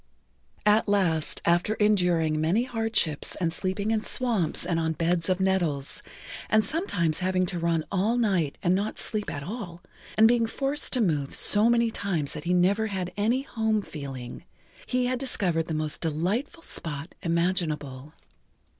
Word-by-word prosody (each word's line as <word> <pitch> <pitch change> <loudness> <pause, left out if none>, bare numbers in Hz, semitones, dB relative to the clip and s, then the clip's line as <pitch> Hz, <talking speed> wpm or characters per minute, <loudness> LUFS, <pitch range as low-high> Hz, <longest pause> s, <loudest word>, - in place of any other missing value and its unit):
At 210 +2 +4
last, 175 -7 +1
after 175 +5 +2
enduring 180 -7 +2
many 180 +9 +2
hardships 225 - 0
and 165 -3 -1
sleeping 195 +4 -1
in 220 -1 0
swamps 220 -10 0
and 165 -1 0
on 160 0 0
beds 170 +2 0
of 185 0 +1
nettles, 175 -8 0 0.5
and 220 0 +3
sometimes 180 - 0
having 185 0 +1
to 180 -1 -3
run 165 -1 0
all 205 +5 +1
night 190 -11 +1
and 175 - +3
not 200 +3 -1
sleep 210 -1 -1
at 145 - -5
all, 180 -3 -7 0.3
and 220 +1 +7
being 230 -1 +3
forced 275 +5 -1
to 255 - +3
move 150 -9 0
so 210 +3 +4
many 235 -1 +3
times 170 -10 -2
that 150 +1 -7
he 180 - +1
never 200 +5 +2
had 185 -3 -4
any 230 +6 +1
home 220 -5 -1
feeling, 135 -4 -8 0.4
he 250 -1 +1
had 250 0 -1
discovered 180 -11 0
the 160 - -2
most 155 0 -2
delightful 180 - -2
spot 155 - -3
imaginable. 155 -5 -2
185 Hz, 160 wpm, -26 LUFS, 165-220 Hz, 0.5 s, and